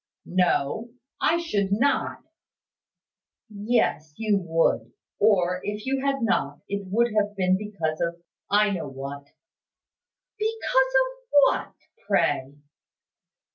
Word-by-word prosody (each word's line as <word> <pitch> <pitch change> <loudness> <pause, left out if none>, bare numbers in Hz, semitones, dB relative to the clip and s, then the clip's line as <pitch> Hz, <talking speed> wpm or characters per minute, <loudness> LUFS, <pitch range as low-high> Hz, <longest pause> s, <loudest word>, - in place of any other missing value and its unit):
"No: 180 +3 0 0.3
I 330 - +3
should 205 - -1
not." 260 +8 +1 1.3
"Yes, 200 -8 0
you 215 -3 +1
would. 165 -2 +1 0.3
Or, 180 -4 +3
if 210 +1 -4
you 265 0 -1
had 275 -2 0
not, 145 -10 0
it 200 -1 -4
would 230 +4 +1
have 205 -1 +1
been 185 -1 +2
because 190 -6 -3
of 170 0 -1 0.3
I 210 +1 +4
know 180 -6 -3
what." 140 +1 -7 1.1
"Because 445 +1 -2 0.4
of - - -11 0.2
what, - - +1 0.3
pray?" 135 +2 +1
200 Hz, 110 wpm, -25 LUFS, 170-230 Hz, 1.3 s, I